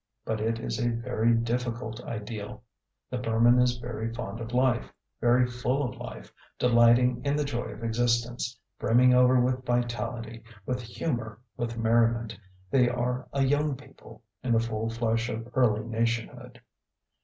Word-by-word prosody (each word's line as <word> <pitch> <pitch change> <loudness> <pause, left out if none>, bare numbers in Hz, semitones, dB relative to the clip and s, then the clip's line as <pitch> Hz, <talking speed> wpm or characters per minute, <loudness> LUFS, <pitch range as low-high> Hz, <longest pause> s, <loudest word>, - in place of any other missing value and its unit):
But 110 -1 -2
it 115 +1 0
is - - -3
a 120 0 +1
very 115 -1 0
difficult 115 0 -2
ideal. 105 -1 -6 0.5
The 125 - -2
Burman 120 +1 +4
is 125 -1 +2
very 115 -1 -4
fond 115 -2 -6
of 115 0 -6
life, 125 -1 +1 0.3
very 120 +1 +4
full 125 +3 -1
of - - -7
life, 60 0 -9 0.2
delighting 120 +1 +4
in 140 0 +1
the 150 - +1
joy 130 -4 -3
of - - -8
existence, 120 +1 0 0.2
brimming 125 +2 +5
over 125 0 +5
with 125 +1 +1
vitality, 120 -1 -2 0.2
with 125 0 -2
humour, 120 -2 -4 0.2
with 115 -1 -3
merriment. 115 0 +2 0.4
They 125 -3 +4
are 125 +1 -2
a 140 -1 +1
young 145 +1 +1
people, - - -15 0.2
in 125 -2 0
the 115 - +4
full 115 -1 -2
flush 115 0 0
of 115 +1 -4
early 110 -4 +2
nationhood. 115 0 -2
120 Hz, 155 wpm, -28 LUFS, 115-125 Hz, 0.5 s, brimming